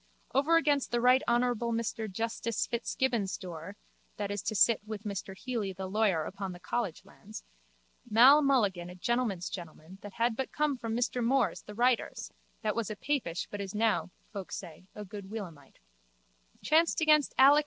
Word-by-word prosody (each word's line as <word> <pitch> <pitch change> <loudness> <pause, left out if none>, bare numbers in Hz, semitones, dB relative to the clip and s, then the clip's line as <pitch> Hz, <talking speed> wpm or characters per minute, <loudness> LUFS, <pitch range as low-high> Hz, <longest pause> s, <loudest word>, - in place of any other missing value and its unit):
Over 290 +5 +4
against 290 -4 +2
the 240 - 0
Rt. 250 +2 +5
Hon. 240 +1 +3 0.3
Mr 220 -2 -3
Justice 225 +2 -2
Fitzgibbon's 235 -4 -1
door 175 +2 -8 0.4
(that 205 -1 -3
is 205 -2 -2
to 215 - -3
sit 225 +3 +4
with 215 -1 -7
Mr 195 -2 -5
Healy 225 -6 -3
the 190 +1 -6
lawyer 190 -4 +1
upon 195 +2 -5
the 175 - -11
college 190 -1 -3
lands) 210 +2 -11 0.7
Mal. 255 +7 +8
Mulligan 205 -11 +1
a 180 - -9
gentleman's 215 -3 -1
gentleman 170 +1 -9
that 205 -1 -9
had 230 +1 +1
but 265 +2 -3
come 300 -2 +1
from 230 -2 -3
Mr 245 0 0
Moore's 265 +3 +1
the 210 - -11
writer's 245 +1 0 0.3
(that 215 -1 0
was 230 -3 -2
a 215 - -4
papish 230 - -2
but 205 - -4
is 195 0 -6
now, 220 -3 +1 0.2
folk 195 -3 -6
say, 180 0 -8
a 210 - -7
good 200 0 -9
Williamite) 185 -9 -8 0.9
chanced 325 +2 +3
against 305 -2 +4
Alec. 280 +3 +8
215 Hz, 175 wpm, -30 LUFS, 195-250 Hz, 0.9 s, Mal